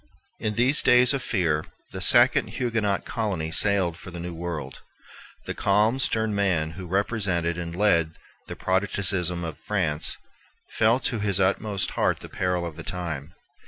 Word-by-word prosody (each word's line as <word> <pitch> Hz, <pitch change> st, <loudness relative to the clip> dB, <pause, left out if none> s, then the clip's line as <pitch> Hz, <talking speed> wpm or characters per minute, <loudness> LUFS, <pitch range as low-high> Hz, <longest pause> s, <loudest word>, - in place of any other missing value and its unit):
In 105 Hz, -1 st, -2 dB
these 125 Hz, +5 st, +3 dB
days 125 Hz, +2 st, +5 dB
of 140 Hz, -, -2 dB
fear, 80 Hz, -10 st, 0 dB, 0.3 s
a -, -, -6 dB
second -, -, +6 dB
Huguenot 115 Hz, -5 st, -1 dB
colony 100 Hz, -9 st, -3 dB
sailed 95 Hz, -3 st, +3 dB
for 95 Hz, -, -11 dB
the 90 Hz, -1 st, -8 dB
New 85 Hz, +1 st, -6 dB
World. 85 Hz, -2 st, -6 dB, 0.6 s
The -, -, -4 dB
calm, 105 Hz, +6 st, +1 dB
stern 110 Hz, -4 st, 0 dB
man 90 Hz, -6 st, 0 dB
who 90 Hz, +2 st, -9 dB
represented 95 Hz, -3 st, 0 dB
and 85 Hz, -1 st, -6 dB
led 85 Hz, -5 st, +2 dB, 0.3 s
the -, -, -7 dB
Protestantism 95 Hz, -2 st, +1 dB
of 80 Hz, -3 st, -6 dB
France 80 Hz, -8 st, -1 dB, 0.5 s
felt 115 Hz, +4 st, +2 dB
to 120 Hz, -, -1 dB
his 100 Hz, -2 st, 0 dB
inmost 100 Hz, +1 st, 0 dB
heart -, -, 0 dB
the -, -, -10 dB
peril 90 Hz, -1 st, -2 dB
of 80 Hz, -3 st, -7 dB
the -, -, -7 dB
time. 85 Hz, -4 st, -5 dB
95 Hz, 160 wpm, -25 LUFS, 85-105 Hz, 0.6 s, second